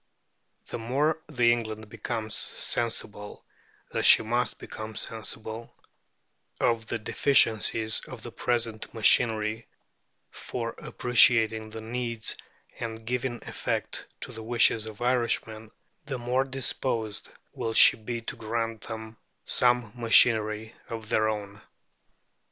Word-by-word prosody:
The - - -5
more 145 +7 0
that 150 -5 -12
England 110 -2 +1
becomes 110 0 -4
sensible, 105 -3 -2 0.5
as - - -1
she - - +7
must 120 +2 -1
become 110 0 -8
sensible, 110 +1 -4 0.9
of 115 -2 +1
the - - -2
deficiencies 110 -2 +2
of 125 -4 -10
the 120 - -7
present 115 -2 -2
machinery 110 0 +3 0.6
for 115 -1 -5
appreciating 115 -2 +3
the 110 +1 -7
needs 115 -1 -2 0.4
and 115 -1 -6
giving 125 0 -3
effect - - -3
to - - -6
the 110 - -7
wishes 115 -1 +2
of 110 +2 -7
Irishmen, 115 -3 0 0.4
the 135 -2 -3
more 125 +2 0
disposed 125 -4 -1 0.2
will 115 0 -3
she - - +9
be 115 +1 -5
to 115 - -6
grant 115 0 -3
them 110 -1 -8 0.3
some 125 -3 +2
machinery 110 -2 +3 0.2
of 110 -2 -6
their 110 0 +2
own. 100 -1 -5
115 Hz, 115 wpm, -27 LUFS, 110-120 Hz, 0.9 s, she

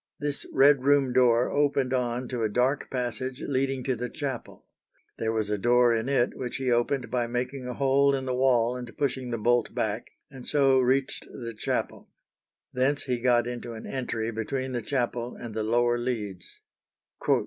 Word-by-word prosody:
This 145 -1 -3
Red 135 0 +5
room 140 -2 +3
door 125 -1 +4
opened 140 -3 +1
on 125 0 -1
to 125 -2 -3
a 110 - +1
dark 125 +6 0
passage 125 +1 -3
leading 135 -1 -1
to 130 -1 0
the 125 +1 -4
chapel. 135 -5 -6 0.5
There 110 0 0
was 110 -2 -1
a 105 - 0
door 120 +2 +4
in 115 +3 -1
it 130 -3 +1
which 125 -2 -4
he 130 -2 -1
opened 125 +2 0
by 120 -2 0
making 125 +2 -3
a 125 - -4
hole 140 0 +3
in 135 -1 -3
the 130 - -1
wall 125 -2 +3
and 125 -2 -8
pushing 130 -3 -1
the 120 - -2
bolt 120 +1 +1
back, 110 +1 -2 0.2
and 130 -3 -10
so 135 -3 +4
reached 130 +1 +1
the 115 -1 -6
chapel. 105 - -3 0.6
Thence 135 +3 +1
he 125 -3 -1
got 120 -1 +3
into 120 -1 -5
an 110 - -8
entry 115 -3 -3
between 130 +4 -3
the 120 -1 -2
chapel 120 -1 -2
and 115 -2 -8
the 110 - -2
lower 120 +2 +2
leads. 105 -7 -5
125 Hz, 180 wpm, -27 LUFS, 120-135 Hz, 0.6 s, Red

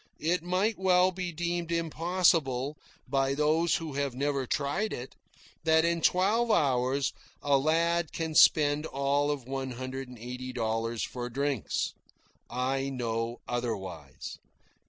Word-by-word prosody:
It 170 +3 +1
might 185 +5 0
well 185 -1 +4
be 180 -1 -4
deemed 170 +1 -2
impossible, 165 -5 +1 0.3
by 135 +1 +1
those 155 +3 +2
who 160 -3 -4
have 140 -2 -2
never 140 -1 -1
tried 165 +10 -1
it, 125 +2 -6 0.5
that 160 0 +4
in 170 0 +1
twelve 205 +8 +3
hours 135 - +2 0.3
a 140 -1 +4
lad 165 +3 +1
can 160 -1 -3
spend 150 0 +5
all 140 +1 +1
of 145 -3 -2
one 135 -1 -3
hundred 130 +1 -5
and 125 - -11
eighty 125 +2 -6
dollars 115 -1 -1
for 125 -1 -4
drinks. 140 -1 -1 0.6
I 135 +2 -1
know 115 -2 -3
otherwise. 115 -7 -4
140 Hz, 135 wpm, -29 LUFS, 130-170 Hz, 0.6 s, spend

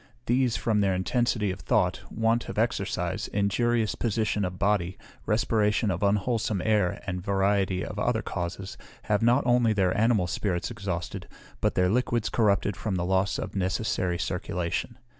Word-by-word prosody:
These, 125 -1 +2
from 110 -3 +1
their 95 -2 +2
intensity 105 +1 0
of 95 - -6
thought, 100 -5 +1
want 115 +1 0
of - - -6
exercise, - - -1
injurious 110 +3 +1
position 110 -2 0
of 90 -1 -3
body, 95 -2 0 0.3
respiration 105 -1 +2
of 90 0 -3
unwholesome 105 +1 +1
air, 105 -5 +1
and 90 -2 -3
a - - -8
variety 95 -1 +1
of 105 - -6
other 110 +1 0
causes, 95 +2 -5 0.2
have 105 0 +1
not 120 +4 +3
only 120 -2 +3
their 95 -3 +1
animal 110 -3 +3
spirits 90 -1 -2
exhausted, 90 -3 -4 0.3
but - - 0
their 90 0 +3
liquids 120 -1 +1
corrupted 105 -2 +2
from 105 -4 -3
the 90 -1 -1
loss 95 +1 +1
of - - -5
a 100 - -2
necessary 95 -2 0
circulation. 90 +1 -3
100 Hz, 160 wpm, -27 LUFS, 95-115 Hz, 0.3 s, not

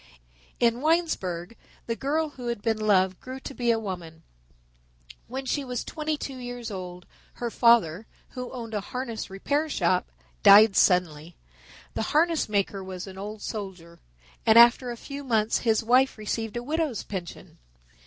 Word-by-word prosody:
In 235 +1 +2
Winesburg 230 - 0 0.3
the 230 - -2
girl 305 +5 -1
who 250 -4 -9
had 235 -4 -3
been 225 -2 0
loved 190 -3 +2
grew 260 +1 -8
to 275 - -7
be 245 -2 -1
a 230 - +4
woman. 175 -6 -7 1.0
When 265 +2 -5
she 285 +2 -1
was 250 -2 -4
twenty 310 0 -3
two 270 -2 -6
years 245 -2 -6
old 180 -2 -7 0.3
her 240 -1 -4
father, 225 -6 +3 0.2
who 250 -1 -7
owned 230 -3 -7
a 210 - -1
harness 235 +1 -5
repair 285 +11 -1
shop, 180 - 0 0.3
died 205 0 +8
suddenly. 170 -4 +2 0.6
The - - -2 0.2
harness 330 -5 +2
maker 200 -1 -1
was 185 -1 -7
an 190 -1 -10
old 210 +1 -7
soldier, 185 -6 -7 0.4
and 225 0 +5
after 240 +2 +7
a 240 - -5
few 280 +4 -8
months 225 -4 +1
his 225 -2 +1
wife 255 +4 +3
received 225 +1 -3
a 240 - -4
widow's 305 -3 -2
pension. 185 -4 -8
225 Hz, 160 wpm, -26 LUFS, 190-255 Hz, 1.0 s, died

